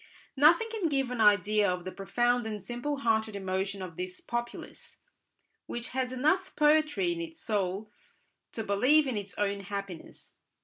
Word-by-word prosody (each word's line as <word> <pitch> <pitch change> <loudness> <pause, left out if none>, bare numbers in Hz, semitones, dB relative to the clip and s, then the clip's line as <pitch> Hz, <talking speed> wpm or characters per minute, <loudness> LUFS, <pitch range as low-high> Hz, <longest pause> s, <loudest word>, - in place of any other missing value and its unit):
Nothing 320 +10 +5
can 415 -7 -1
give 270 -3 0
an 245 -3 -1
idea 210 0 +4
of 180 -1 -3
the 185 - -4
profound 240 +4 0
and 210 -3 -5
simple 245 +7 -3
hearted 220 -2 +1
emotion 190 0 -2
of 170 -3 -8
this 180 0 -5
populace, 240 0 -6 0.7
which 240 +1 -5
has 255 -1 -2
enough 310 +9 +1
poetry 310 +4 +3
in 340 0 -3
its 325 -1 -7
soul 205 -4 -2 0.6
to 225 - -3
believe 255 +10 +4
in 260 -3 -2
its 200 -1 -5
own 200 -1 0
happiness. 200 -3 -8
225 Hz, 160 wpm, -29 LUFS, 200-285 Hz, 0.7 s, Nothing